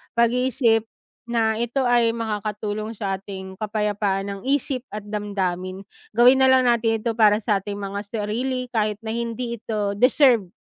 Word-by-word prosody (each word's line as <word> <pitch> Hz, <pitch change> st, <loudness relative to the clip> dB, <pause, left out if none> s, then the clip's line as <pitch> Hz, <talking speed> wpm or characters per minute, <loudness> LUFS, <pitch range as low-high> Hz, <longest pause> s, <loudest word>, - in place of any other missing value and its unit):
pag-iisip 235 Hz, -1 st, +2 dB, 0.4 s
na 225 Hz, -2 st, +1 dB
ito 240 Hz, +3 st, 0 dB
ay 240 Hz, -2 st, +3 dB
makakatulong 215 Hz, 0 st, -3 dB
sa 195 Hz, -2 st, -3 dB
ating 190 Hz, 0 st, -9 dB
kapayapaan 205 Hz, -2 st, -1 dB
ng 195 Hz, -1 st, -7 dB
isip 270 Hz, -2 st, 0 dB
at 210 Hz, -1 st, -6 dB
damdamin. 190 Hz, -2 st, -3 dB, 0.3 s
Gawin 250 Hz, +3 st, +6 dB
nalang 260 Hz, -1 st, +5 dB
natin 225 Hz, -2 st, +2 dB
ito 235 Hz, -, +1 dB
para 215 Hz, -2 st, +5 dB
sa 205 Hz, -3 st, +2 dB
ating 200 Hz, +1 st, -6 dB
mga 200 Hz, 0 st, -4 dB
sarili 245 Hz, +4 st, -2 dB
kahit 215 Hz, -2 st, 0 dB
na 220 Hz, -, -4 dB
hindi 235 Hz, 0 st, -3 dB
ito 210 Hz, -3 st, -2 dB
deserve 250 Hz, -4 st, +4 dB
220 Hz, 145 wpm, -23 LUFS, 205-235 Hz, 0.4 s, Gawin